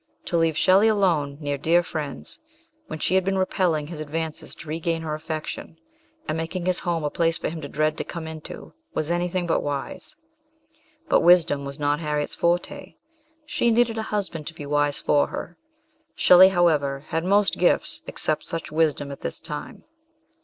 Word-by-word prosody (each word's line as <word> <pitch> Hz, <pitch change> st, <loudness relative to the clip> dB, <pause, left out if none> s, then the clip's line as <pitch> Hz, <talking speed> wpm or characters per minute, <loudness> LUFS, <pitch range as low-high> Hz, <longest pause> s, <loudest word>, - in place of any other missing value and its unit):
To 175 Hz, -, -2 dB
leave 165 Hz, -2 st, +2 dB
Shelley 195 Hz, +5 st, +5 dB
alone, 170 Hz, -10 st, +1 dB
near 145 Hz, -2 st, -3 dB
dear 170 Hz, +4 st, +3 dB
friends, 150 Hz, -6 st, -5 dB, 0.5 s
when -, -, -5 dB
she 165 Hz, -, 0 dB
had 190 Hz, 0 st, +4 dB
been 195 Hz, +1 st, 0 dB
repelling 180 Hz, -5 st, +1 dB
his 155 Hz, 0 st, -8 dB
advances 155 Hz, +1 st, -4 dB
to -, -, -12 dB
regain 165 Hz, +1 st, -2 dB
her 155 Hz, -1 st, -3 dB
affection, 155 Hz, +1 st, -5 dB, 0.5 s
and 155 Hz, -, -1 dB
making 165 Hz, +2 st, -3 dB
his 180 Hz, -1 st, +1 dB
home 170 Hz, -3 st, -1 dB
a 150 Hz, -, -1 dB
place 165 Hz, -1 st, +1 dB
for -, -, -3 dB
him 160 Hz, 0 st, -6 dB
to 145 Hz, -, -6 dB
dread 155 Hz, +2 st, 0 dB
to -, -, -1 dB
come 170 Hz, -2 st, -7 dB
into, 160 Hz, -1 st, -9 dB, 0.2 s
was 155 Hz, +2 st, -1 dB
anything 175 Hz, +1 st, -1 dB
but 165 Hz, -, +1 dB
wise; 145 Hz, -1 st, -5 dB, 0.9 s
but -, -, +4 dB
wisdom 165 Hz, -5 st, +4 dB
was 140 Hz, 0 st, -6 dB
not 145 Hz, 0 st, +1 dB
Harriet's 150 Hz, -2 st, -1 dB
forte 175 Hz, +12 st, -1 dB, 0.5 s
she 240 Hz, -5 st, +1 dB
needed 230 Hz, -1 st, +2 dB
a 220 Hz, -, -4 dB
husband 190 Hz, -7 st, -3 dB
to 170 Hz, -, -6 dB
be 145 Hz, -, -7 dB
wise 145 Hz, 0 st, +1 dB
for 145 Hz, -, +2 dB
her. 175 Hz, -, -7 dB, 0.6 s
Shelley, 185 Hz, +1 st, +8 dB
however, 150 Hz, -6 st, +1 dB
had 165 Hz, 0 st, -1 dB
most 200 Hz, +2 st, +2 dB
gifts, 175 Hz, -, +2 dB
except 155 Hz, -, -1 dB
such 165 Hz, -2 st, -4 dB
wisdom 150 Hz, -3 st, +1 dB
at 140 Hz, -, -9 dB
this -, -, -5 dB
time. -, -, -6 dB
165 Hz, 180 wpm, -24 LUFS, 150-175 Hz, 0.9 s, Shelley